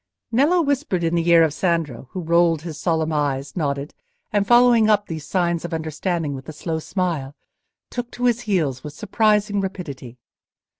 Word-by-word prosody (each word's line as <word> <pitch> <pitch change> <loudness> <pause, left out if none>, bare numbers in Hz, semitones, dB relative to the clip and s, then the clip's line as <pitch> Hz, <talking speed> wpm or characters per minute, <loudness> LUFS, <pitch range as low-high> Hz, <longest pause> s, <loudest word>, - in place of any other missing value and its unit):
Nello 300 +9 +3
whispered 280 - 0
in 165 0 0
the 170 0 +1
ear 170 -1 +7
of 155 -3 +1
Sandro, 165 -7 -1
who 185 - -5
rolled 170 -1 +2
his 160 -3 -7
solemn 160 -1 0
eyes, 140 -2 -1
nodded, 140 -3 -2 0.4
and, 200 -1 +1
following 240 -2 +5
up 210 -1 +3
these 155 -4 -7
signs 175 -2 0
of 170 -1 -3
understanding 160 0 -2
with 135 +2 -8
a - - -6
slow 160 +1 -3
smile, 160 -6 -3 0.6
took 245 -1 -4
to 245 - -2
his 240 -1 +2
heels 145 -10 0
with 150 - -7
surprising 210 +2 +1
rapidity. 145 -11 -6
170 Hz, 170 wpm, -22 LUFS, 150-205 Hz, 0.6 s, ear